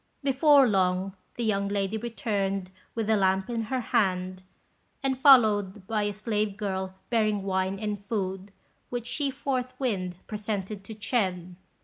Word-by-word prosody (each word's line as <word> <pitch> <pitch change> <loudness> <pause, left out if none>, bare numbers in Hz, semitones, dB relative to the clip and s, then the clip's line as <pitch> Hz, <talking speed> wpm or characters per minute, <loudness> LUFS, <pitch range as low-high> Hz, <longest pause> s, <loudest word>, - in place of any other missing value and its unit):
Before 275 0 +5
long, 190 -1 +1 0.2
the 240 - -3
young 200 -3 +1
lady 200 0 -1
returned 200 -4 -2 0.2
with 225 -2 -1
a 220 - +4
lamp 190 +2 +1
in 230 -1 -1
her 260 +4 -1
hand, 185 -4 0 0.6
and 270 -1 +1
followed 215 -8 +5
by 215 +1 0
a 205 - 0
slave 210 -1 -2
girl 190 -2 -3 0.2
bearing 215 -3 +2
wine 190 0 0
and 205 -1 -3
food, 195 -2 -3 0.4
which 240 -1 -3
she 275 +3 -1
forthwith 255 -9 -2
presented 210 -2 -4
to 220 - -8
Ch'ên. 185 -6 -1
210 Hz, 140 wpm, -27 LUFS, 190-235 Hz, 0.6 s, Before